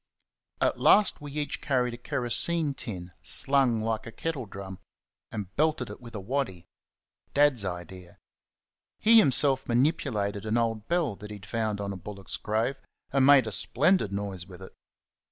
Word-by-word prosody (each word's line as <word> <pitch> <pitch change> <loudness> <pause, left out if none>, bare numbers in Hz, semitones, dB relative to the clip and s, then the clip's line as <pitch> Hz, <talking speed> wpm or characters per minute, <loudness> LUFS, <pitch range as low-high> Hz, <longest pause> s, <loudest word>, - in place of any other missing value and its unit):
At - - +1
last 205 -7 +4
we 145 -1 -8
each 150 -1 -3
carried 125 -3 0
a - - -7
kerosene 140 +5 0
tin, 90 -9 -7
slung 135 -5 +2
like 110 0 -2
a - - -7
kettle 135 0 -4
drum, 95 -1 -8 0.5
and 100 -4 -6
belted 155 +1 +1
it - - -11
with 115 -2 -11
a - - -3
waddy 100 -5 -3 0.7
Dad's 145 -6 +4
idea. 90 -1 -7 0.8
He 225 +1 +6
himself 135 - +4
manipulated 115 -6 0
an 110 +2 +1
old 115 -2 -1
bell 170 - 0
that 105 - -10
he 105 - -7
had 100 -1 -12
found 110 -2 -2
on 100 -1 -3
a - - -7
bullock's 100 +1 -7
grave, 110 +6 -1 0.4
and 135 -1 +4
made 140 -3 +7
a 110 - -4
splendid 135 - +1
noise 100 -3 -3
with 95 -1 -11
it. - - -12
115 Hz, 165 wpm, -28 LUFS, 100-140 Hz, 0.8 s, made